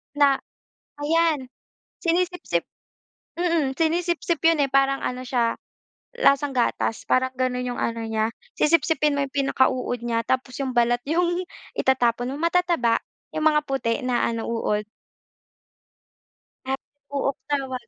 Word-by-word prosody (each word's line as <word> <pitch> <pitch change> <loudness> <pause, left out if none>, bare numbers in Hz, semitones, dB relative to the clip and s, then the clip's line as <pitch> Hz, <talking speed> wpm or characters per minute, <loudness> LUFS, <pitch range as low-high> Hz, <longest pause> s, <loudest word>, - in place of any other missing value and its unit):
Na 280 -2 +4 0.6
ayan, 310 -2 +2 0.5
sinisipsip 350 - 0 0.8
mm, 330 -6 +1
sinisipsip 340 0 +1
'yon, 330 -2 +5
eh, 275 - 0
parang 275 0 +3
ano 255 0 -3
siya, 240 -2 0 0.6
lasang 280 - +3
gatas, 235 -2 0
parang 260 0 +2
gano'n 250 0 -1
'yong - - -5
ano 230 0 -1
niya. 220 0 0 0.3
Sisipsipin 300 -1 +3
mo 285 - 0
'yong 270 - -13
pinaka-uod 260 -3 +1
niya, 230 -1 0
tapos 255 -1 -1
'yong 260 -1 -2
balat 240 0 +3
'yong 350 +4 +1 0.3
itatapon 245 -1 +1
mo. - - -5
Matataba, 335 -9 +2 0.4
'yong 310 - -1
mga 300 -1 +5
puti 250 -2 -1
na 250 -1 +1
ano, 230 -1 -3
uod. 210 -2 0 1.8
Ah, 265 +1 0 0.4
Uok 275 -1 0
tawag. 265 -3 -2
270 Hz, 130 wpm, -24 LUFS, 245-315 Hz, 1.8 s, yon